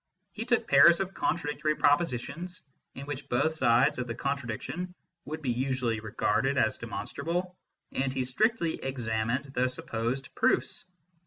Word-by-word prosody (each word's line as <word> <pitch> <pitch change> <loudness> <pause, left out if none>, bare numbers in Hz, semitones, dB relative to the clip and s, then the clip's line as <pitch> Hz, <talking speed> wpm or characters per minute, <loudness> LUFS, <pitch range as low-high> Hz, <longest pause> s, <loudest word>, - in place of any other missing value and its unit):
He - - -5
took - - +1
pairs 145 +5 +7
of 195 0 -2
contradictory 150 -1 0
propositions, 165 +4 0 0.3
in 135 - -7
which 145 -2 -6
both 160 +6 +2
sides 130 -1 +3
of 125 - -2
the 115 - -4
contradiction 140 +7 -3 0.3
would 155 +1 -6
be 130 - +1
usually 125 -2 0
regarded 110 -1 0
as - - +2
demon - - -4
strable, 175 +5 -3 0.4
and 135 0 0
he 130 -1 -1
strictly 170 - +1
examined 125 +1 -2
the 125 -1 +2
supposed 125 +1 -3
proofs. - - +1
135 Hz, 145 wpm, -29 LUFS, 125-160 Hz, 0.4 s, pairs